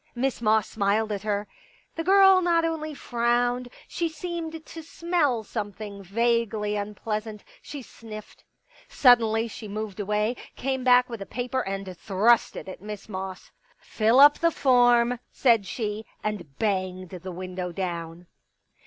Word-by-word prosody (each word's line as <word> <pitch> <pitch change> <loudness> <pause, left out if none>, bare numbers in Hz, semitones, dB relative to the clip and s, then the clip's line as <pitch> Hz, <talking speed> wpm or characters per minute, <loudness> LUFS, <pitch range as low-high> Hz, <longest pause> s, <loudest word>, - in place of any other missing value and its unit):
Miss 255 0 -1
Moss 215 -2 +3
smiled 215 +1 0
at 200 -2 -3
her. 205 -1 -2 0.5
The 330 - -3
girl 385 +1 +6
not 340 -2 +2
only 310 -2 -3
frowned; 245 0 0 0.2
she 340 -1 -2
seemed 325 0 -6
to 330 - -9
smell 315 -7 0
some 210 -1 -4
thing 200 -1 -8
vaguely 215 +1 0
unpleasant; 210 +1 -4 0.2
she 285 -3 -8
sniffed. 215 -2 -11 0.5
Suddenly 230 -3 +4
she 220 0 -8
moved 210 -1 -5
away, 210 +3 0 0.2
came 265 0 -2
back 250 0 +5
with 230 -4 -7
a 195 - -6
paper 250 +1 -2
and 195 -3 -5
thrust 215 +5 +2
it - - -7
at 185 - -9
Miss 210 0 -8
Moss. 190 -2 -7 0.2
" - - -34 0.2
Fill 225 +4 +4
up 290 +1 +8
the 335 - +4
form! 245 -4 +3
" - - -46
said 230 -6 +3
she. 215 +1 -4 0.2
And 180 -10 -4
banged 185 -4 -2
the 185 0 -7
window 180 0 -5
down. 170 -1 -5
220 Hz, 155 wpm, -26 LUFS, 200-250 Hz, 0.5 s, up